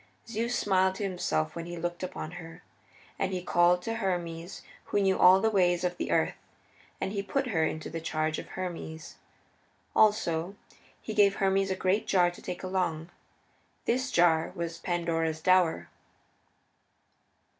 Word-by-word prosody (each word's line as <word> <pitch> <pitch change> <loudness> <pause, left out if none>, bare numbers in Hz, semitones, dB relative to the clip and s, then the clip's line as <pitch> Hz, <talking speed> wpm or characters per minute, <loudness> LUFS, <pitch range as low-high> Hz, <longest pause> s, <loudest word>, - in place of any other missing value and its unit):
Zeus 230 +2 -2
smiled 190 -1 +2
to 205 - -4
himself 125 - -1
when 170 0 -5
he 175 0 -6
looked 175 +1 -4
upon 180 -3 -5
her, 165 0 -12 0.6
and 195 -1 0
he 180 -2 -3
called 175 0 +3
to 225 +2 -3
Hermes 175 -4 -3 0.2
who - - 0
knew 190 -1 +3
all 185 +1 +7
the 220 +2 +1
ways 180 -3 +2
of 175 -1 -1
the - - -3
earth, - - +2 0.7
and 190 - -2
he 200 -1 -2
put 270 +6 -2
her 165 -7 +1
into 155 - -4
the 165 0 -5
charge 155 -1 -1
of - - -8
Hermes. 165 -4 -6 0.8
Also 200 -4 +2 0.4
he 220 - -6
gave 200 -2 +4
Hermes 195 0 +1
a 190 - 0
great 190 +3 0
jar 180 -2 +3
to 175 - -13
take 180 0 -6
along; 180 -3 -2 0.7
this 255 +2 0
jar 170 -6 +3
was 170 -2 -4
Pandora's 165 -2 -1
dower. 180 0 +3
180 Hz, 155 wpm, -29 LUFS, 165-195 Hz, 0.8 s, all